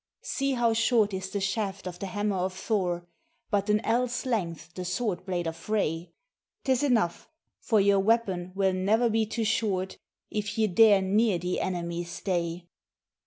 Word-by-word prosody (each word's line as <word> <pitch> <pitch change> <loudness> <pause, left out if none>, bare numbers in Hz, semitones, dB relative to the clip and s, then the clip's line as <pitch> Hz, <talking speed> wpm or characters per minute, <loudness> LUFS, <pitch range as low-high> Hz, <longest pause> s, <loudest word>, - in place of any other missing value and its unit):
See 275 0 -1
how 235 -2 +2
short 225 -2 +3
is 190 0 -3
the 200 - -2
shaft 195 0 -2
of 180 -1 -6
the 195 - -4
hammer 205 +1 -1
of 185 +1 -1
Thor, 180 -4 -1 0.5
but 205 0 +1
an 210 0 +3
ell's 245 +3 0
length 175 -8 -2
the 185 - -5
sword 185 0 -2
blade 175 -2 -1
of 165 0 -3
Frey; 165 -2 -2 0.5
'Tis 260 -2 +2
enough, 230 -12 +1 0.3
for 220 - +2
your 200 0 +4
weapon 195 -4 +1
will 190 -1 +2
ne'er 215 +6 +2
be 220 0 +1
too 225 +1 -2
short 200 -4 -1 0.3
if 210 0 -3
you 220 -1 +3
dare 205 0 +6
near 205 +1 +2
the 180 +1 -2
enemy 175 -2 -2
stay. 175 -1 -3
195 Hz, 165 wpm, -28 LUFS, 180-220 Hz, 0.5 s, dare